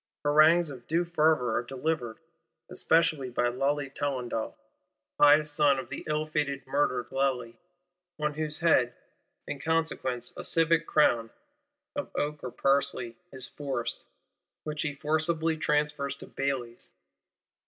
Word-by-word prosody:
Harangues 155 Hz, +2 st, +5 dB
of 125 Hz, -3 st, -11 dB
due 170 Hz, +2 st, +1 dB
fervour 155 Hz, -8 st, +2 dB
are -, -, +1 dB
delivered; 125 Hz, -2 st, -3 dB, 0.5 s
especially 160 Hz, -5 st, +2 dB
by 120 Hz, 0 st, +1 dB
Lally 140 Hz, +3 st, -1 dB
Tollendal, 130 Hz, -5 st, -3 dB, 0.6 s
pious 150 Hz, +1 st, +6 dB
son 145 Hz, -2 st, +3 dB
of 130 Hz, -2 st, -6 dB
the 140 Hz, -, -6 dB
ill 155 Hz, 0 st, 0 dB
fated 145 Hz, -3 st, -2 dB
murdered 130 Hz, -3 st, 0 dB
Lally; 130 Hz, -3 st, -1 dB, 0.6 s
on 150 Hz, 0 st, -1 dB
whose 155 Hz, 0 st, -1 dB
head, 130 Hz, -8 st, +3 dB, 0.5 s
in 145 Hz, -, -5 dB
consequence, 145 Hz, -6 st, -1 dB
a -, -, -6 dB
civic 165 Hz, 0 st, +4 dB
crown 115 Hz, -7 st, +3 dB, 0.7 s
(of 290 Hz, -, -4 dB
oak 150 Hz, 0 st, -2 dB
or 130 Hz, -, -3 dB
parsley) 135 Hz, -3 st, 0 dB, 0.2 s
is 130 Hz, -1 st, -6 dB
forced,—which 140 Hz, +3 st, -7 dB
he 145 Hz, -3 st, -2 dB
forcibly 160 Hz, +2 st, 0 dB
transfers 150 Hz, -2 st, -1 dB
to -, -, -10 dB
Bailly's. 130 Hz, -4 st, -4 dB
145 Hz, 125 wpm, -28 LUFS, 130-155 Hz, 0.7 s, pious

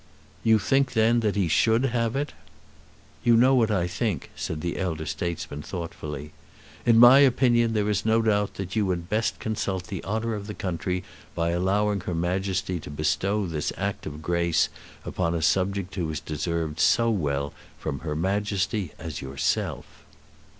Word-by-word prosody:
"You 110 Hz, -1 st, +5 dB
think, 135 Hz, +6 st, +1 dB
then, 115 Hz, +1 st, +4 dB
that 105 Hz, -3 st, 0 dB
he 100 Hz, -4 st, +1 dB
should 115 Hz, -, +3 dB
have 115 Hz, -1 st, 0 dB
it?" 145 Hz, +2 st, -2 dB, 0.9 s
"You 120 Hz, -1 st, +5 dB
know 130 Hz, +3 st, +5 dB
what 120 Hz, -4 st, +3 dB
I 95 Hz, -5 st, +1 dB
think," 90 Hz, -, -2 dB
said 75 Hz, -1 st, -4 dB
the 85 Hz, 0 st, -3 dB
elder 80 Hz, -5 st, -2 dB
statesman 75 Hz, -1 st, -4 dB
thoughtfully. 75 Hz, -4 st, -6 dB, 0.6 s
"In 115 Hz, -1 st, +6 dB
my 120 Hz, +3 st, +9 dB
opinion 120 Hz, -4 st, +4 dB
there 105 Hz, -2 st, +1 dB
is 105 Hz, -1 st, 0 dB
no 110 Hz, +1 st, +3 dB
doubt 105 Hz, -2 st, +1 dB
that 95 Hz, -1 st, -5 dB
you 105 Hz, -3 st, +2 dB
would 90 Hz, -2 st, -2 dB
best 110 Hz, +2 st, 0 dB
consult 100 Hz, -4 st, -2 dB
the 95 Hz, -2 st, -6 dB
honour 110 Hz, +3 st, -2 dB
of 105 Hz, -1 st, -5 dB
the 105 Hz, -, -6 dB
country 90 Hz, 0 st, -2 dB, 0.3 s
by 85 Hz, 0 st, 0 dB
allowing 100 Hz, +4 st, +1 dB
her 90 Hz, -1 st, -4 dB
Majesty 90 Hz, +1 st, -1 dB
to 75 Hz, -, -9 dB
bestow 95 Hz, +8 st, 0 dB
this 80 Hz, -4 st, -2 dB
act -, -, -3 dB
of 75 Hz, +1 st, -7 dB
grace 85 Hz, -1 st, +2 dB, 0.4 s
upon 85 Hz, -2 st, -1 dB
a 85 Hz, -, -1 dB
subject 95 Hz, +4 st, +1 dB
who 85 Hz, -5 st, -2 dB
has 80 Hz, -, -3 dB
deserved 80 Hz, 0 st, -3 dB
so 115 Hz, +5 st, +4 dB
well 70 Hz, -7 st, -1 dB, 0.2 s
from 70 Hz, -, -4 dB
her 75 Hz, 0 st, -4 dB
Majesty 100 Hz, +1 st, -1 dB
as 80 Hz, -3 st, -6 dB
yourself." 70 Hz, 0 st, -1 dB
95 Hz, 170 wpm, -26 LUFS, 85-110 Hz, 0.9 s, my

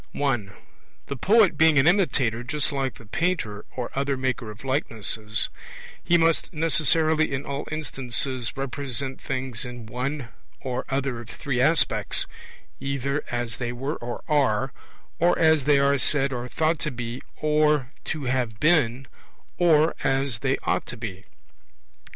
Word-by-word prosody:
(1) 120 Hz, -9 st, 0 dB, 0.5 s
The 140 Hz, -, -4 dB
poet 205 Hz, -, +4 dB
being 160 Hz, -1 st, +6 dB
an 135 Hz, -, +5 dB
imitator 135 Hz, -, +2 dB
just 150 Hz, +4 st, -1 dB
like 135 Hz, -2 st, -1 dB
the 115 Hz, -, -14 dB
painter 110 Hz, -, -1 dB
or 125 Hz, -2 st, -3 dB
other 140 Hz, 0 st, 0 dB
maker 130 Hz, -3 st, -2 dB
of 105 Hz, +3 st, -10 dB
likenesses, 110 Hz, -5 st, -1 dB, 0.5 s
he 175 Hz, -, +4 dB
must 165 Hz, -1 st, +2 dB
necessarily 155 Hz, -1 st, +2 dB
in 140 Hz, 0 st, -2 dB
all 140 Hz, +1 st, -4 dB
instances 130 Hz, -5 st, -3 dB
represent 135 Hz, 0 st, -3 dB
things 130 Hz, -4 st, -3 dB
in 125 Hz, -2 st, -7 dB
one 125 Hz, +3 st, -3 dB, 0.3 s
or 130 Hz, -1 st, -3 dB
other 135 Hz, -3 st, -1 dB
of 115 Hz, -1 st, -10 dB
three 130 Hz, -1 st, -2 dB
aspects, 155 Hz, +5 st, +2 dB, 0.5 s
either 140 Hz, +1 st, -1 dB
as 120 Hz, -3 st, -3 dB
they 120 Hz, -1 st, -2 dB
were 135 Hz, +5 st, -3 dB
or 120 Hz, 0 st, -6 dB
are, 135 Hz, -4 st, +2 dB, 0.5 s
or 175 Hz, +1 st, +4 dB
as 160 Hz, -4 st, +4 dB
they 145 Hz, -1 st, +5 dB
are 140 Hz, 0 st, +3 dB
said 140 Hz, 0 st, +1 dB
or 125 Hz, 0 st, -4 dB
thought 160 Hz, +4 st, +1 dB
to 155 Hz, -, -2 dB
be 120 Hz, -1 st, -5 dB, 0.2 s
or 150 Hz, -3 st, +2 dB
to 155 Hz, -3 st, -3 dB
have 125 Hz, -4 st, -1 dB
been, 135 Hz, -6 st, +3 dB, 0.5 s
or 160 Hz, -2 st, +5 dB
as 135 Hz, -4 st, +1 dB
they 135 Hz, +3 st, +1 dB
ought -, -, 0 dB
to 125 Hz, -, -7 dB
be. 95 Hz, -5 st, -6 dB
135 Hz, 150 wpm, -25 LUFS, 120-150 Hz, 0.5 s, being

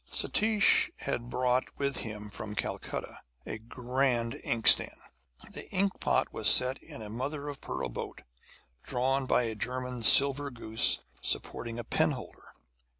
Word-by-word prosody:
Satish 215 Hz, -1 st, +4 dB
had 120 Hz, 0 st, -3 dB
brought 125 Hz, 0 st, -1 dB
with 140 Hz, -2 st, -2 dB
him 105 Hz, -2 st, -7 dB
from 105 Hz, +1 st, -6 dB
Calcutta -, -, -5 dB, 0.2 s
a 110 Hz, -, -6 dB
grand 120 Hz, +1 st, -2 dB
inkstand. 115 Hz, -1 st, +4 dB, 0.5 s
The -, -, -7 dB
inkpot 195 Hz, +1 st, 0 dB
was -, -, +3 dB
set 130 Hz, +1 st, +4 dB
in 110 Hz, -, -9 dB
a 105 Hz, -, -8 dB
mother 140 Hz, +5 st, -4 dB
of 140 Hz, -, -9 dB
pearl -, -, -4 dB
boat -, -, -8 dB, 0.6 s
drawn 130 Hz, +2 st, -1 dB
by 125 Hz, -, +2 dB
a 115 Hz, -1 st, -3 dB
German 125 Hz, +2 st, -4 dB
silver 140 Hz, +4 st, +5 dB
goose 110 Hz, -3 st, +2 dB, 0.2 s
supporting 115 Hz, -, -3 dB
a 120 Hz, -, -4 dB
penholder. -, -, -2 dB
125 Hz, 135 wpm, -29 LUFS, 115-135 Hz, 0.6 s, silver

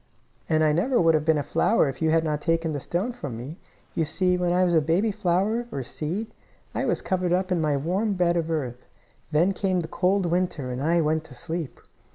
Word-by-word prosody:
"And 155 Hz, -1 st, +3 dB
I 155 Hz, -, +4 dB
never 240 Hz, -, +2 dB
would 165 Hz, -1 st, +4 dB
have 155 Hz, -1 st, +1 dB
been 160 Hz, -1 st, +3 dB
a 145 Hz, -, -1 dB
flower 220 Hz, 0 st, +2 dB
if 135 Hz, -, -5 dB
you 160 Hz, -, +2 dB
had 160 Hz, 0 st, +3 dB
not 150 Hz, -2 st, -1 dB
taken 165 Hz, -1 st, 0 dB
the 145 Hz, -, -2 dB
stone 180 Hz, -, -2 dB
from 145 Hz, -, -6 dB
me. 140 Hz, +9 st, -8 dB, 0.3 s
You 165 Hz, -, +1 dB
see, 180 Hz, +3 st, +1 dB
when 180 Hz, -1 st, 0 dB
I 180 Hz, +1 st, +3 dB
was 175 Hz, -1 st, +2 dB
a 160 Hz, -, +5 dB
baby 175 Hz, +9 st, +1 dB
flower, 210 Hz, +4 st, 0 dB
or 135 Hz, -, -3 dB
seed, 185 Hz, -, -4 dB, 0.4 s
I -, -, -1 dB
was -, -, -1 dB
covered 180 Hz, -2 st, 0 dB
up 185 Hz, +1 st, 0 dB
in 175 Hz, -2 st, +2 dB
my 150 Hz, -2 st, +1 dB
warm 190 Hz, +9 st, 0 dB
bed 175 Hz, -2 st, +2 dB
of 165 Hz, -1 st, -1 dB
earth. 130 Hz, -6 st, -3 dB, 0.4 s
Then 165 Hz, +5 st, +3 dB
came 185 Hz, -2 st, 0 dB
the 160 Hz, -, -5 dB
cold 185 Hz, +3 st, +1 dB
winter, 170 Hz, -6 st, -1 dB
and 125 Hz, +1 st, -4 dB
I 165 Hz, +3 st, +2 dB
went 155 Hz, 0 st, +1 dB
to 135 Hz, -, -13 dB
sleep. 165 Hz, -1 st, -5 dB
170 Hz, 230 wpm, -25 LUFS, 155-185 Hz, 0.4 s, a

